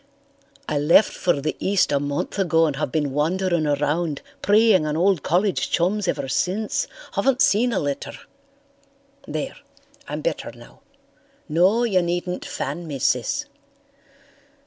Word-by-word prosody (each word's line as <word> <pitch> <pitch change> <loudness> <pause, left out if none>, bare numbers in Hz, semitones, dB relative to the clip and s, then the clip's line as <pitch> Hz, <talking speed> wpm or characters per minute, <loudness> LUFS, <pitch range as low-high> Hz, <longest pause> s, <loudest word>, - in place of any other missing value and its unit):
"I 150 - 0
left 165 +8 +4
for 175 -5 0
the 155 +2 -2
East 195 -4 +1
a 140 - +2
month 145 +7 -3
ago 165 -3 +3
and 150 -3 -1
have 140 - -2
been 145 -2 0
wandering 170 +3 0
around 150 +2 -1 0.2
preying 205 -5 +4
on 150 +1 -1
old 185 -1 +2
college 185 +6 0
chums 195 +3 0
ever 135 - -1
since. 210 - -1 0.3
Haven't 265 -1 +1
seen 245 -2 +3
a 215 - -1
letter. 145 -4 -3 1.1
There, - - -4 0.5
I'm - - -4
better - - -3
now. - - -16 0.7
No, 185 +9 +3
you 195 -6 +2
needn't 175 +1 -3
fan 160 +5 -5
me, 145 -3 -4
Sis. - - 0
175 Hz, 140 wpm, -23 LUFS, 150-200 Hz, 1.1 s, left